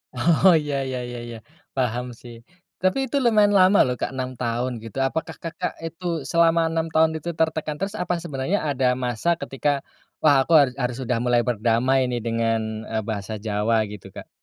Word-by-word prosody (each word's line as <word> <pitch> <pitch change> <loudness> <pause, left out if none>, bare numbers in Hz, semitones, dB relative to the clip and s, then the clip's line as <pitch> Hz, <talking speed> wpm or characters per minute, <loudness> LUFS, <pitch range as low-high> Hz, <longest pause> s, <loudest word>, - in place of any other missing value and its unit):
Oh, 170 +6 +5
iya 145 -1 -3
iya 130 -1 -3
iya 120 - -6
iya. 115 -1 -7 0.4
Paham 125 -1 0 0.2
sih. 120 -1 -11 0.5
Tapi 185 +4 +2
itu 280 - -2
lumayan 210 -3 +4
lama 185 +2 +6
loh 125 -1 -1
Kak - - 0
6 130 0 -3
tahun 120 +1 -1
gitu. 115 +3 -9
Apakah 160 +4 -4
Kakak 175 +2 -4
itu 165 +2 -8 0.3
selama 170 0 +4
6 165 0 -1
tahun 160 0 +4
itu 170 - -5
tertekan 160 -2 0
terus? 195 +4 -3
Apa 180 - -1
sebenarnya 150 +4 -1
ada 135 -2 0 0.2
masa 120 +6 -1
ketika, 135 +2 -2 0.5
"Wah, 150 -2 +6
aku 165 +5 0
harus 135 -3 +3
harus 125 -1 -2
sudah 125 -1 -1
mulai 120 -1 +3
berdamai 120 +3 +2
ini 125 -1 -2
dengan, 115 -1 +1 0.3
eee, 110 -1 -2
bahasa 105 -1 -4
Jawa," 110 +2 +1
gitu 105 -2 -10
Kak? - - -9
130 Hz, 185 wpm, -23 LUFS, 120-165 Hz, 0.5 s, lama